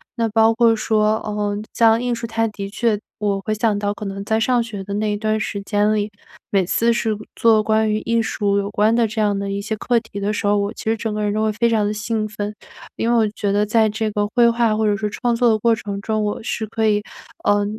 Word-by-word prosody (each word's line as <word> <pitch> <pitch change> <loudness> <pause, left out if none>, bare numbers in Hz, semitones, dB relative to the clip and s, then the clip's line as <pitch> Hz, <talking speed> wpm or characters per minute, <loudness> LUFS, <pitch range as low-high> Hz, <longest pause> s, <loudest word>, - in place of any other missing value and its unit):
那 230 -2 0
包 225 +1 +4
括 230 0 +4
说， 215 0 +1
呃， 205 -1 -2 0.2
像 225 0 +4
艺 245 -1 -1
术， 230 - -5
它 225 0 0
的 200 -2 -6
确 225 0 0 0.2
我 200 -2 0
会 215 - -2
想 215 -1 +1
到 205 0 -1
可 210 - -8
能 195 0 -5
在 220 +1 0
上 245 +2 +2
学 210 -4 -7
的 200 +1 -6
那 210 0 0
一 205 - -1
段 215 0 0
时 200 -1 -3
间 210 +1 +1
里， 210 0 -1 0.4
每 195 -2 +2
次 230 +6 +2
是 220 -2 -1 0.2
做 225 -2 +4
关 220 0 +2
于 215 - 0
艺 230 +1 0
术 200 -2 0
有 200 0 -1
关 215 +2 +2
的 235 -2 +3
这 215 +1 -5
样 205 -1 +1
的 200 0 -3
一 200 0 -2
些 220 - -3
课 240 +2 +1
题 220 -3 -9
的 200 +1 -1
时 210 - -3
候， 205 0 +3
我 200 +1 -1
其 - - -9
实 225 +1 +2
整 220 0 -3
个 210 0 -2
人 205 0 0
都 215 0 0
会 220 - +1
非 235 +3 +1
常 215 -2 +2
地 205 - 0
兴 215 0 -2
奋。 210 -1 -5 0.4
因 230 - 0
为 240 - +3
我 220 - +3
觉 205 -1 -2
得 205 +1 +2
在 220 +1 +3
这 220 +1 -2
个 205 0 0
绘 235 -1 +6
画， 230 -2 +2
或 220 - +1
者 205 -1 +2
是 210 0 -2
创 240 +2 -1
作 240 0 +3
的 220 - +3
过 230 +1 +3
程 200 -2 -5
中， 215 0 -1
我 205 - -2
是 225 - -2
可 220 +1 -1
以， 210 -1 +2 0.4
呃， 205 0 +2
215 Hz, 285 characters per minute, -20 LUFS, 205-225 Hz, 0.4 s, 绘